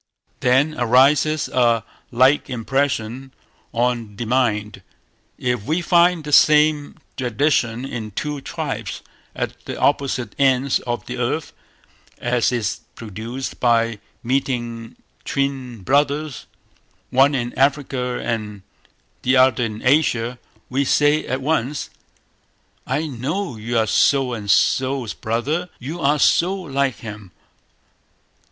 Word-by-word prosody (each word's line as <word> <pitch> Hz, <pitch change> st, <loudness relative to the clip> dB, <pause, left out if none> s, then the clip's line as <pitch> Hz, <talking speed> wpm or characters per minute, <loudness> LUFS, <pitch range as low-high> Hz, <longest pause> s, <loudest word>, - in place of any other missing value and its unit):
Then 130 Hz, +5 st, +3 dB
arises 140 Hz, +5 st, +3 dB
a 120 Hz, -3 st, +2 dB, 0.3 s
like 130 Hz, +4 st, +3 dB
impression 130 Hz, 0 st, -2 dB, 0.4 s
on 115 Hz, -3 st, -1 dB
the 120 Hz, -, -4 dB
mind, 110 Hz, -4 st, 0 dB, 0.6 s
if 125 Hz, -4 st, -1 dB
we 160 Hz, +6 st, 0 dB
find 175 Hz, 0 st, +4 dB
the 150 Hz, 0 st, -5 dB
same 150 Hz, 0 st, +4 dB, 0.2 s
tradition 125 Hz, -1 st, 0 dB
in 115 Hz, -5 st, -5 dB
two 145 Hz, +7 st, -4 dB
tribes -, -, -5 dB, 0.3 s
at -, -, -4 dB
the -, -, -6 dB
opposite 135 Hz, -6 st, 0 dB
ends 135 Hz, -1 st, +3 dB
of 120 Hz, 0 st, -3 dB
the -, -, -6 dB
earth, -, -, -2 dB, 0.6 s
as 120 Hz, 0 st, +1 dB
is 115 Hz, -3 st, -2 dB, 0.2 s
produced 115 Hz, +4 st, -6 dB
by 115 Hz, -2 st, +2 dB, 0.2 s
meeting 120 Hz, -3 st, -2 dB, 0.3 s
twin 130 Hz, -6 st, -3 dB
brothers, 145 Hz, +1 st, 0 dB, 0.6 s
one 135 Hz, +3 st, +4 dB
in 120 Hz, -2 st, -2 dB
Africa 135 Hz, -2 st, 0 dB
and 105 Hz, -4 st, -4 dB, 0.6 s
the 130 Hz, +1 st, +3 dB
other 130 Hz, -1 st, +4 dB
in 110 Hz, -2 st, -4 dB
Asia; 125 Hz, -4 st, +2 dB, 0.3 s
we 135 Hz, +2 st, 0 dB
say 145 Hz, +2 st, +2 dB
at 130 Hz, +1 st, -2 dB
once 145 Hz, -1 st, -1 dB, 1.0 s
"I 145 Hz, +5 st, -1 dB
know 145 Hz, +4 st, -3 dB
you 115 Hz, +2 st, -3 dB
are 110 Hz, -, +3 dB
so 130 Hz, +3 st, +2 dB
and 105 Hz, -3 st, -6 dB
so's 130 Hz, 0 st, +2 dB
brother, 145 Hz, +11 st, -2 dB
you 150 Hz, +8 st, -6 dB
are 145 Hz, +1 st, +3 dB
so 175 Hz, +6 st, +3 dB
like 140 Hz, -9 st, -2 dB
him". 105 Hz, -4 st, -9 dB
130 Hz, 120 wpm, -21 LUFS, 115-145 Hz, 1.0 s, find